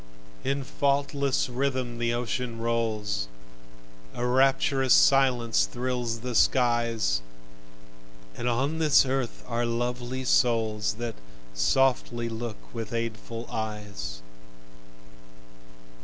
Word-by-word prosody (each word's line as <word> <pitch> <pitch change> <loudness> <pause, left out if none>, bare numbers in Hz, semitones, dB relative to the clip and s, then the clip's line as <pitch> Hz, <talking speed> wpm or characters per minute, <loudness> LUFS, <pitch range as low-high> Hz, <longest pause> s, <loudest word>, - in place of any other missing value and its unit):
In 135 +1 -1
faultless 140 0 0
rhythm 130 -2 -2
the 120 0 +1
ocean 120 0 -2
rolls, 110 - -1 0.9
A 120 - -2
rapturous 135 +1 +3
silence 125 -4 +4
thrills 120 -2 -2
the 125 0 -4
skies; 115 - +2 1.1
And 120 - -2
on 135 +7 0
this 155 -3 +5
earth 130 -2 -2
are 120 -1 -1
lovely 120 +2 -2
souls, 110 -5 +2
That 120 0 -4 0.4
softly 120 - +1
look 115 -1 -5 0.2
with 115 -1 -5
aidful 115 0 -4
eyes. 105 - -5
120 Hz, 95 wpm, -27 LUFS, 115-130 Hz, 1.1 s, this